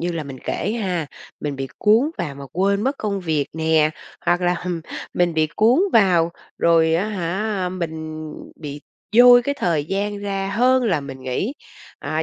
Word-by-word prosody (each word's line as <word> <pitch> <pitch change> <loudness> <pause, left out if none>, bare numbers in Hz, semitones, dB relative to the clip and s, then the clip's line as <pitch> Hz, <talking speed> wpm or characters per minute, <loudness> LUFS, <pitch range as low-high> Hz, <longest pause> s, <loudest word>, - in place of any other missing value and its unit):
như 175 +1 -1
là 160 -3 -3
mình 135 -2 -8
kể 210 - -2
ha, 175 -6 -1 0.3
mình 145 -2 -3
bị 135 0 -3
cuốn 225 +9 +4
vào 150 -5 -3
mà 140 - -9
quên 200 +3 +1
mất 270 +4 0
công 200 -2 -2
việc 155 -5 0
nè, 160 -1 +2 0.4
hoặc 175 +1 +3
là, 180 0 +2
hừm, 180 -2 -3 0.3
mình 175 -2 +1
bị 155 0 +3
cuốn 235 +9 +4
vào 180 -6 +4 0.3
rồi 165 -1 +4
á 190 +6 0
hả 195 0 -2
mình 160 -3 -5 0.3
bị 145 -1 -6 0.4
dôi 245 0 +9
cái 285 +3 -1
thời 160 -5 +1
gian 200 +3 -2
ra 195 -1 -3
hơn 255 +2 +4
là 170 -9 +1
mình 135 -2 -9
nghĩ. 130 - -2 0.5
À, 155 +1 -2
175 Hz, 180 wpm, -21 LUFS, 155-205 Hz, 0.5 s, dôi